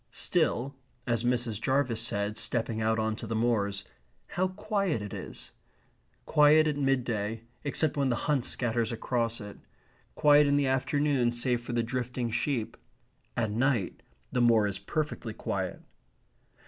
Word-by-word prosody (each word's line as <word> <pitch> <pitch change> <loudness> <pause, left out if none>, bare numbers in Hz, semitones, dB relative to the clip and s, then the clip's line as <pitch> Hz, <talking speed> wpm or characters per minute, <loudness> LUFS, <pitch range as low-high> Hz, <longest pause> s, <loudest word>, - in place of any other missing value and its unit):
Still, 140 - 0 0.3
as 115 -1 0
Mrs. 120 -3 0
Jarvis 130 -4 +1
said, 105 -2 -1
stepping 115 0 -1
out 110 +1 +2
on 110 0 0
to 115 - -7
the 115 - -2
moors, 105 -4 0 0.5
"How 185 +1 0
quiet 195 - -1
it 105 -1 -7
is!" - - -8 0.7
Quiet 150 +1 +5
at 150 -2 0
midday, 120 -6 -1 0.2
except 150 +1 +1
when 140 -2 +2
the 120 - +1
hunt 145 -5 +2
scatters 115 -2 0
across 115 0 -1
it; 105 -2 -9 0.6
quiet 145 0 +6
in 140 - +3
the 145 - +2
afternoon, 135 -1 +1
save 120 0 0
for 120 0 -6
the 120 -1 +1
drifting 125 0 -3
sheep; 120 -1 -1 0.6
at 110 -3 0
night 120 -3 0 0.3
the 125 - +1
moor 115 -3 +5
is 100 -1 -2
perfectly 120 0 -3
quiet. - - -3
120 Hz, 150 wpm, -29 LUFS, 110-140 Hz, 0.7 s, quiet